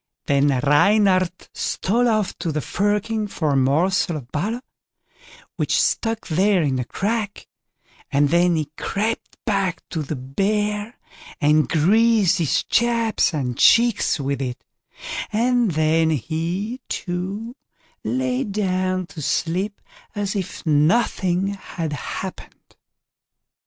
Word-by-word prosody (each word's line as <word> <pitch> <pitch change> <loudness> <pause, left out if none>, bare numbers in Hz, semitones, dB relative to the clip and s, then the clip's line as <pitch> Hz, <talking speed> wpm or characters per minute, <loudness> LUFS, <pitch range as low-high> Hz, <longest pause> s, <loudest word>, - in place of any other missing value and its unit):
Then 140 0 +3
Reynard 185 +6 +4 0.2
stole 235 +6 0
off 215 -4 0
to 170 -2 -2
the 150 - -1
firkin 210 +5 -1
for 160 -6 -1
a - - +1
morsel 155 +6 +2
of 125 -4 -10
butter, 220 - -2 0.9
which - - +1
stuck 225 -1 0
there 185 +2 +2
in 135 -3 0
a 125 - -2
crack, 210 - -3 0.6
and 145 0 +2
then 175 +2 +3
he 150 -2 -2
crept 220 +3 -2
back 195 -4 -1
to 165 - -3
the 150 +1 -4
Bear, 205 - -1 0.4
and 150 +1 +3
greased 205 +4 +3
his 165 +1 +1
chaps 230 -4 +2
and 130 -6 -3
cheeks 230 -7 +4
with 140 -1 -2
it; 125 -2 -4 0.7
and 235 -2 +2
then 160 +1 +2
he, 170 - -2
too, 195 +6 -4 0.5
lay 125 +2 -1
down 185 -2 -1
to 170 -3 -9
sleep 185 +8 -1 0.4
as 205 0 -2
if 185 -3 -5
nothing 180 +4 +2
had 170 -5 -5
happened. 145 - -7
185 Hz, 120 wpm, -22 LUFS, 155-210 Hz, 0.9 s, Reynard